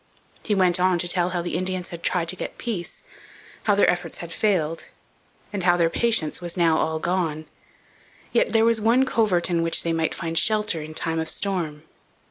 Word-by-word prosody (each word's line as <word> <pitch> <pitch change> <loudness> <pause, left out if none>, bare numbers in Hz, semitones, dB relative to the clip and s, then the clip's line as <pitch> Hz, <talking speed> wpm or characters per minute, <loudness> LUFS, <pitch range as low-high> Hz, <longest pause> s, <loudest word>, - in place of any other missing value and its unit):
He 210 - -1
went 185 -2 +3
on 185 0 +3
to 175 - +1
tell 175 0 +1
how 175 -1 -2
the 175 - -4
Indians 185 -1 -2
had 170 -1 -8
tried 170 -2 0
to 185 - 0
get - - -6
peace, 210 -8 -5 0.6
how 205 - +4
their 205 - +4
efforts 180 0 -1
had 170 -1 -7
failed, 165 -7 0 0.7
and 195 -3 -3
how 175 -1 +4
their 165 -1 +2
patience 220 -9 +1
was 175 +1 -5
now 165 -2 +3
all 160 0 0
gone. 160 -2 -1 0.9
Yet - - +2
there 225 0 +4
was 230 -1 +2
one 240 +5 +4
covert 210 -9 +1
in 170 -1 +2
which 165 0 +1
they 165 - 0
might 160 -1 -1
find 165 -1 -1
shelter 210 -6 +1
in 155 +1 -8
time 165 0 -1
of 160 - -2
storm. 170 -7 -3
175 Hz, 200 wpm, -24 LUFS, 165-195 Hz, 0.9 s, how